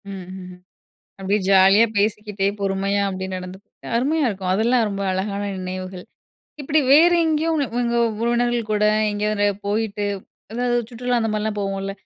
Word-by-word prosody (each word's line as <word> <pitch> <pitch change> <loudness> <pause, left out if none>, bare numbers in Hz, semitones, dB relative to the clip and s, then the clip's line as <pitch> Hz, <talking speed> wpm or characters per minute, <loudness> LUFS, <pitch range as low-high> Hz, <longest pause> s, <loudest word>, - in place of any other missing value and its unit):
ம்ஹ்ம். 185 -1 -8 0.7
அப்படியே 195 +2 0
ஜாலியா 195 +3 +6
பேசிக்கிட்டே 210 -1 -1
பொறுமையா 195 +1 0
அப்படியே 190 0 -4
நடந்து 185 +1 -8 0.4
அருமையா 290 +4 +1
இருக்கும், 190 -3 -3
அதெல்லாம் 230 +3 +2
ரொம்ப 200 -1 -4
அழகான 200 +2 -2 0.2
நினைவுகள். 185 0 -6 0.6
இப்படி 295 +3 +2
வேறு 335 +4 +6
எங்கயும் 320 +1 +1
உங்க 290 -3 0
உங்க 235 -1 0 0.3
உறவினர்கள் 240 -1 0
கூட 210 0 +2 0.3
எங்கயாவது 205 0 0 0.2
போயிட்டு 210 -1 -1 0.5
அதாவது 245 +1 0
சுற்றுலா 245 0 -1
அந்த 225 -1 -1
மாரிலாம் 215 0 -2
போவோம்ல்ல? 195 0 -3
210 Hz, 135 wpm, -21 LUFS, 195-240 Hz, 0.7 s, ஜாலியா